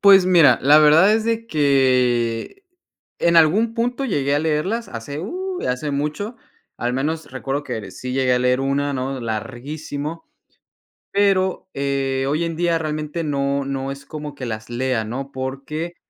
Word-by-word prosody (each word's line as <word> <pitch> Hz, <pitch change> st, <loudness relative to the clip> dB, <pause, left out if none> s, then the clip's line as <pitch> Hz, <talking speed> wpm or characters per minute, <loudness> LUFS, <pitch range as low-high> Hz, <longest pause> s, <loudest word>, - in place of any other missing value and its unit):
Pues 195 Hz, -2 st, +7 dB
mira, 175 Hz, -5 st, +6 dB
la 145 Hz, +3 st, +7 dB
verdad 155 Hz, +7 st, +6 dB
es 220 Hz, 0 st, +1 dB
de 230 Hz, 0 st, -1 dB
que, 130 Hz, -, +1 dB, 0.5 s
en 170 Hz, 0 st, +3 dB
algún 205 Hz, +9 st, +4 dB
punto 245 Hz, +3 st, -1 dB
llegué 145 Hz, -, 0 dB
a -, -, +3 dB
leerlas, 160 Hz, +10 st, -1 dB
hace 125 Hz, +5 st, -6 dB
u, 365 Hz, -, -4 dB
hace 125 Hz, +4 st, -2 dB
mucho. 150 Hz, -, -3 dB, 0.4 s
Al 120 Hz, +1 st, -2 dB
menos 155 Hz, +4 st, -2 dB
recuerdo 135 Hz, +2 st, -3 dB
que -, -, -4 dB
ere 100 Hz, -3 st, -7 dB
sí 125 Hz, +6 st, -6 dB
llegué 130 Hz, -1 st, +2 dB
a -, -, +2 dB
leer 125 Hz, +1 st, +2 dB
una, 140 Hz, +1 st, 0 dB
¿no?, 130 Hz, 0 st, -3 dB
larguísimo. 140 Hz, +7 st, -5 dB, 0.9 s
Pero, 190 Hz, -2 st, +1 dB
eh, 135 Hz, -1 st, -1 dB
hoy 155 Hz, +4 st, 0 dB
en 165 Hz, -1 st, -2 dB
día 170 Hz, 0 st, +1 dB
realmente 155 Hz, +1 st, -3 dB
no 140 Hz, -2 st, -1 dB
no 135 Hz, 0 st, -3 dB
es 140 Hz, 0 st, -9 dB
como 150 Hz, -1 st, -7 dB
que 130 Hz, -, -6 dB
las 110 Hz, -1 st, -5 dB
lea, 120 Hz, -1 st, -1 dB
¿no?, 135 Hz, +5 st, -5 dB
porque 140 Hz, +6 st, -5 dB
145 Hz, 165 wpm, -21 LUFS, 130-170 Hz, 0.9 s, Pues